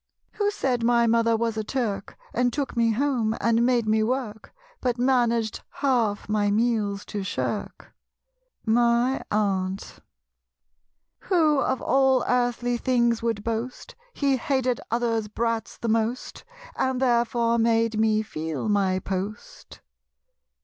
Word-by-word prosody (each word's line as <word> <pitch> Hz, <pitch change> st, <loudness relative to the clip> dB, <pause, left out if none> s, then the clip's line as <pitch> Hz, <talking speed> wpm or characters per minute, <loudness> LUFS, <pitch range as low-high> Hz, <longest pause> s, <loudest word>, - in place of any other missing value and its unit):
Who 410 Hz, -1 st, 0 dB
said 265 Hz, -, -1 dB
my 235 Hz, 0 st, +4 dB
mother 230 Hz, 0 st, +3 dB
was 225 Hz, -1 st, -1 dB
a 220 Hz, -, -1 dB
Turk, 215 Hz, -4 st, -3 dB, 0.2 s
And 245 Hz, +1 st, +1 dB
took 280 Hz, +1 st, -3 dB
me 230 Hz, -1 st, +3 dB
home 240 Hz, -3 st, 0 dB
and 230 Hz, 0 st, +2 dB
made 240 Hz, -2 st, +2 dB
me 220 Hz, 0 st, +3 dB
work, 220 Hz, -2 st, -3 dB, 0.3 s
But 250 Hz, -1 st, 0 dB
managed 240 Hz, -3 st, +1 dB
half 235 Hz, -7 st, 0 dB
my 210 Hz, -1 st, +1 dB
meals 210 Hz, -2 st, 0 dB
to 205 Hz, -, -4 dB
shirk? 190 Hz, -, -4 dB, 0.7 s
My 235 Hz, +3 st, +2 dB
Aunt. 195 Hz, -2 st, -1 dB, 1.3 s
Who 315 Hz, -6 st, +3 dB
"of 260 Hz, -2 st, -1 dB
all 265 Hz, -1 st, +3 dB
earthly 245 Hz, 0 st, +1 dB
things" 235 Hz, -2 st, +1 dB
would 225 Hz, -3 st, -2 dB
boast, 230 Hz, +3 st, -4 dB, 0.2 s
"He 275 Hz, -2 st, +1 dB
hated 260 Hz, -3 st, 0 dB
others' 230 Hz, -2 st, 0 dB
brats 230 Hz, +1 st, -2 dB
the 235 Hz, -, -4 dB
most," 225 Hz, +2 st, -1 dB, 0.3 s
And 260 Hz, -1 st, 0 dB
therefore 235 Hz, -2 st, +2 dB
made 225 Hz, -1 st, +2 dB
me 220 Hz, -1 st, +2 dB
feel 160 Hz, -3 st, -4 dB
my 195 Hz, -3 st, +2 dB
post? 200 Hz, -, -6 dB
235 Hz, 130 wpm, -25 LUFS, 220-250 Hz, 1.3 s, my